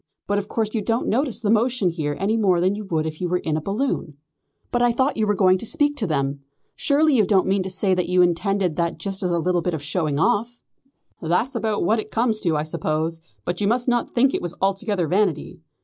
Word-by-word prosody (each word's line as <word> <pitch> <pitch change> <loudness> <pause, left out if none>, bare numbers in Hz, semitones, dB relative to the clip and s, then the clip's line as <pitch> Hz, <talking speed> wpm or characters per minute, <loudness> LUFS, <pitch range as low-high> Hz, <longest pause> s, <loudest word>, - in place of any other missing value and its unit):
But 205 0 0
of 200 - -6
course 220 -1 -2
you 225 - 0
don't 225 +4 -1
notice 255 +2 0
the 210 -2 +1
motion 230 -3 +2
here 155 -4 -3
any 205 +3 +1
more 195 -6 +2
than 185 +3 +2
you 210 +1 -6
would 160 -4 -1
if 155 +1 -6
you 180 - -1
were 180 - +1
in 160 -3 -2
a 155 - -1
balloon." 195 - -2 0.5
"But 240 - +1
I 245 0 +4
thought 260 +4 +1
you 215 -1 0
were 210 - +2
going 185 -1 +4
to - - -5
speak 290 +3 +1
them. 140 - -1 0.4
Surely 300 +1 +3
you 220 - +4
don't 195 -1 +3
mean 195 0 +1
to 185 - -4
say 190 +1 +1
that 180 -1 -1
you 180 0 +4
intended 180 0 0
that 170 -1 -1
just 195 +4 -4
as 180 - 0
a 170 - +1
little 175 +1 +1
bit 175 -1 -1
of 150 - -6
showing 155 -2 -1
off?" 230 +8 0 0.6
"That's 180 +11 0
about 220 -3 -1
what 220 +6 +2
it - - -6
comes 225 -1 0
to, 170 -7 0
I 150 - -1
suppose, 155 +1 -2 0.2
but 175 +2 -3
you 200 - +2
must 240 +3 +1
not 240 -1 0
think 265 +3 +3
it - - -1
was 175 -1 -5
altogether 195 -1 0
vanity. 190 0 0
195 Hz, 245 wpm, -22 LUFS, 170-225 Hz, 0.6 s, I